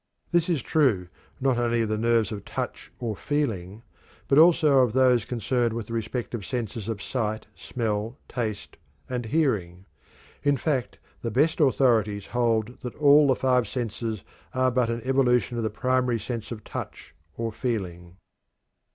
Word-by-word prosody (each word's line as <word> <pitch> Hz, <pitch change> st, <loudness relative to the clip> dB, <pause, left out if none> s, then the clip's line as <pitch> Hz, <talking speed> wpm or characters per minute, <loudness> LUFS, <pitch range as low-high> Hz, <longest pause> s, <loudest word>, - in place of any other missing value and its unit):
This 175 Hz, 0 st, +2 dB
is 160 Hz, -8 st, 0 dB
true 115 Hz, -, +2 dB, 0.3 s
not 130 Hz, -2 st, +1 dB
only 120 Hz, -1 st, +1 dB
of 110 Hz, -, -2 dB
the 110 Hz, -, +1 dB
nerves 115 Hz, -2 st, +2 dB
of 105 Hz, -2 st, -5 dB
touch -, -, -5 dB
or 115 Hz, -3 st, -3 dB
feeling, 110 Hz, -8 st, -2 dB, 0.4 s
but 140 Hz, -, +5 dB
also 155 Hz, -4 st, +6 dB
of 125 Hz, -4 st, +3 dB
those 125 Hz, -4 st, +4 dB
concerned 120 Hz, 0 st, 0 dB
with 115 Hz, -1 st, -4 dB
the 115 Hz, -, -8 dB
respective 115 Hz, -1 st, -3 dB
senses 115 Hz, -2 st, -4 dB
of 105 Hz, -3 st, -4 dB
sight, 110 Hz, -4 st, -2 dB
smell, 110 Hz, 0 st, -3 dB
taste, 110 Hz, -4 st, -4 dB, 0.3 s
and 125 Hz, -2 st, -3 dB
hearing. 105 Hz, -, 0 dB, 0.6 s
In 145 Hz, -1 st, +2 dB
fact, 130 Hz, -2 st, -1 dB, 0.2 s
the 115 Hz, -, -2 dB
best 150 Hz, -, +2 dB
authorities 115 Hz, -8 st, +3 dB
hold 120 Hz, -1 st, 0 dB
that 125 Hz, -, -6 dB
all 145 Hz, 0 st, +6 dB
the 130 Hz, -, +4 dB
five 125 Hz, -3 st, +2 dB
senses 110 Hz, -2 st, -4 dB, 0.3 s
are 130 Hz, 0 st, +3 dB
but 125 Hz, -1 st, +1 dB
an 115 Hz, 0 st, -2 dB
evolution 125 Hz, -2 st, +2 dB
of 115 Hz, -, -1 dB
the 110 Hz, -, 0 dB
primary 125 Hz, +1 st, 0 dB
sense 115 Hz, +1 st, -5 dB
of 110 Hz, -2 st, -6 dB
touch 80 Hz, -, -7 dB, 0.2 s
or 115 Hz, -1 st, -2 dB
feeling. 95 Hz, -7 st, -4 dB
120 Hz, 160 wpm, -26 LUFS, 110-130 Hz, 0.6 s, also